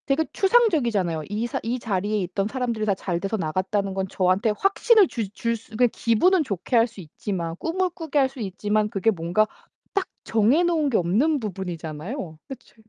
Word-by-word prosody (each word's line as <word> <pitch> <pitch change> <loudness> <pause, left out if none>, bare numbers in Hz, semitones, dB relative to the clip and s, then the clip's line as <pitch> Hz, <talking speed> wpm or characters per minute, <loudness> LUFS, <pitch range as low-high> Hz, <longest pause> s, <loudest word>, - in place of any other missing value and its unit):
되게 280 +3 +2
추상적이잖아요. 245 - +2
이 210 +3 -1
사 - - -3
이 235 +3 -1
자리에 210 -1 -1
있던 190 +3 -2
사람들이 235 -3 -2
다 200 -2 +2
잘돼서 195 +3 -2
나갔다는 190 +4 -1
건 190 0 -2
저한테 190 +4 +2
확신을 410 +1 +4
줄 225 -8 -4
줄 230 +2 -1
수 225 0 -13
그러니까 245 +3 +3
기분은 330 - +3
좋게 200 - -3
할 230 0 +5
수 225 - -13
있지만 170 +1 -4
꿈을 365 - -1
꾸게 325 -4 -4
할 270 - +4
수 270 0 -13
있지만 210 +1 -1
그게 205 +2 +1
뭔가 175 +3 +1 0.5
딱 395 -2 0 0.2
정해 230 +10 +3
놓은 325 -4 +2
게 240 - +2
없는 235 - +2
부분이잖아요. 175 - -5
그치 270 - -11
215 Hz, 380 characters per minute, -24 LUFS, 190-270 Hz, 0.5 s, 할